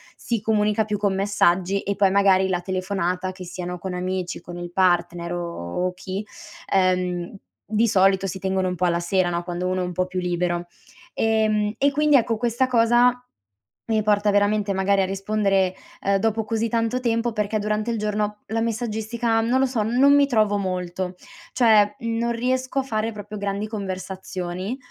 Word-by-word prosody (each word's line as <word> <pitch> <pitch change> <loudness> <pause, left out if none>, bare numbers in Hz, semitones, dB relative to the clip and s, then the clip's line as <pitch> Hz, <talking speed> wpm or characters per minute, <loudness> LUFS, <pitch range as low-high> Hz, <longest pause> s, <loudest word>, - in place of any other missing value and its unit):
si 235 -2 -2
comunica 210 0 +1
più 210 -1 -2
con 200 -2 +1
messaggi 195 -1 +1
e 200 - -2
poi, 195 -1 +3
magari, 195 -1 +4
la 180 -1 -1
telefonata, 185 0 -2
che 185 0 -10
siano 180 0 -6
con 185 +1 -5
amici, 185 0 -3
con 175 0 -9
il 175 0 -6
partner 175 -1 +1
o 170 - -3
chi 190 +2 -5 0.5
ehm 180 -1 +1 0.4
di 220 +2 +3
solito 195 -2 +3
si 190 0 -4
tengono 190 0 0
un 180 - -1
po' 180 0 0
alla 170 -1 +1
sera 175 +1 +1
no, 170 0 -2
quando 175 +1 -3
uno 185 0 0
è 180 - -1
un 180 - -4
po' 185 +1 0
più 185 0 -3
libero, 175 -1 -1 0.5
ehm, 215 -1 +1
e 280 +1 +3
quindi, 300 +1 +3
ecco, 230 -2 +1
questa 240 +2 +1
cosa 240 +1 +3 0.7
mi 220 -1 +2
porta 205 0 +2
veramente 205 0 +2
magari 195 +1 +2
a 190 - +2
rispondere, 195 -1 0 0.3
uhm, 200 0 +2
dopo 220 +2 0
così 225 +1 -1
tanto 230 +2 0
tempo 235 -1 0
perché 215 0 -1
durante 210 +2 -1
il 230 - -1
giorno 210 0 -2
la 225 +1 -1
messaggistica 225 0 -1
non 245 +4 +1
lo - - +4
so 250 -4 0
non 250 +6 +4
mi 285 0 +5
trovo 215 -5 +2
molto. 185 -1 -3 0.4
Cioè, 215 -4 +4
mhmm, 230 0 -2
non 235 +1 0
riesco 255 +3 -1
a - - -1
fare 225 -3 -2
proprio 210 0 -8
grandi 200 +1 -2
conversazioni. 190 0 -5
200 Hz, 180 wpm, -23 LUFS, 185-225 Hz, 0.7 s, mi